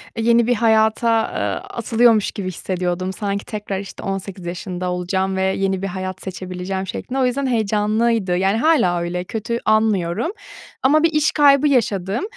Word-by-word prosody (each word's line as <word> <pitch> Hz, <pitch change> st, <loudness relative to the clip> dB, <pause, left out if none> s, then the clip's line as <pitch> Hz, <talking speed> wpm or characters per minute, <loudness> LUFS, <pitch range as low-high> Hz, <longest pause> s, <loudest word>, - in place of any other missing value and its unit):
eee, 225 Hz, -, -2 dB
yeni 235 Hz, 0 st, +4 dB
bir 245 Hz, -, +3 dB
hayata, 225 Hz, +1 st, +3 dB
ııı, -, -, -2 dB
atılıyormuş 230 Hz, -2 st, +2 dB
gibi 200 Hz, -4 st, -5 dB
hissediyordum. 185 Hz, 0 st, -3 dB
Sanki 200 Hz, 0 st, -3 dB
tekrar, 205 Hz, -3 st, -4 dB
işte, 200 Hz, -, -9 dB
18 195 Hz, -2 st, -5 dB
yaşında 180 Hz, +1 st, -4 dB
olacağım 190 Hz, +2 st, -1 dB
ve 190 Hz, -, -1 dB
yeni 190 Hz, 0 st, 0 dB
bir 195 Hz, -, -2 dB
hayat 185 Hz, 0 st, -5 dB
seçebileceğim 185 Hz, 0 st, -5 dB
şeklinde. 260 Hz, +7 st, -4 dB
O 255 Hz, -, +3 dB
yüzden 265 Hz, +2 st, 0 dB
heyecanlıydı, 215 Hz, -3 st, +1 dB
yani 195 Hz, +3 st, +1 dB
hâlâ 230 Hz, -, +3 dB
öyle, 175 Hz, +1 st, -3 dB
kötü 225 Hz, +3 st, -3 dB
anmıyorum. 215 Hz, -, +1 dB, 0.5 s
Ama 305 Hz, +4 st, +4 dB
bir 330 Hz, -, +5 dB
iş 305 Hz, 0 st, +2 dB
kaybı 285 Hz, -1 st, +5 dB
yaşadım. 210 Hz, -, 0 dB
200 Hz, 160 wpm, -20 LUFS, 185-230 Hz, 0.5 s, bir